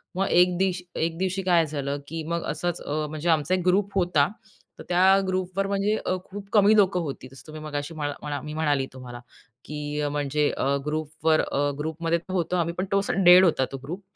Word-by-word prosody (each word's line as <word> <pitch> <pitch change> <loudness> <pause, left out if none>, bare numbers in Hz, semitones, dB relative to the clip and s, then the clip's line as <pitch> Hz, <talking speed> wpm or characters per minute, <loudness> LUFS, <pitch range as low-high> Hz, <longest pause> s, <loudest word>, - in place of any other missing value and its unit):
मग 195 +1 0
एक 180 0 +4
दिशी 185 -1 0 0.2
एक 165 0 -2
दिवशी 190 +1 -1
काय 175 -3 +3
झालं 140 -1 -3
की 160 0 -5
मग 170 0 -2
असंच 175 +2 -3
अ, 155 +1 -2
म्हणजे 155 +2 -3
आमचा 160 +2 +2
एक 185 - -2
ग्रुप 195 +2 +2
होता. 175 -6 +3 0.5
तर - - -8
त्या 190 +2 +5
ग्रुपवर 185 +1 -1
म्हणजे 200 +2 0
अ, 185 - +1
खूप 200 0 -9
कमी 210 0 +6
लोकं 190 -3 +3
होती 140 -4 -6
तसं 135 +1 -14
तुम्ही 155 0 -9
मगाशी 145 +1 -4
मला 145 -2 -3
मला 145 -2 -3
मी 150 +2 -7
म्हणाली 145 -4 +1
तुम्हाला 125 -2 -9 0.5
की 150 0 -5
अ, 145 - 0
म्हणजे 145 0 0
अ, - - -1 0.2
ग्रुपवर 155 +1 0
अ, 145 +1 -1
ग्रुपमध्ये 165 +2 -1
होतो 180 -1 -1
आम्ही 170 0 0
पण 185 - -1
तो 195 - +3
असा 195 - -2
डेड 180 +1 +9
होता 135 -6 +2
तो 135 - -5
ग्रुप 175 +8 -6
165 Hz, 210 wpm, -25 LUFS, 150-185 Hz, 0.5 s, डेड